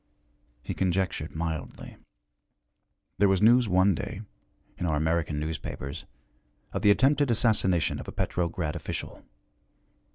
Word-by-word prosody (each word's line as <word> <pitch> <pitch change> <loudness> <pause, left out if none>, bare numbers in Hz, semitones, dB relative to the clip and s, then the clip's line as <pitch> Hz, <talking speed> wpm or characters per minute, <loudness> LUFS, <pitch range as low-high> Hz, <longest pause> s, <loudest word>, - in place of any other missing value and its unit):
He - - -4
conjectured 90 -4 -1
mildly. 80 -2 -5 1.2
There 100 -1 +5
was 95 -1 +3
news 120 +1 +5
one 95 +2 +4
day, 100 +3 -5 0.6
in 90 - -1
our 80 - +1
American 80 0 0
newspapers, 75 -1 -5 0.7
of - - -2
the 105 - +4
attempted 135 +6 +4
assassination 105 -7 +2
of - - -8
a - - -5
Petrograd 85 -3 -2
official. - - -6
90 Hz, 120 wpm, -27 LUFS, 80-100 Hz, 1.2 s, There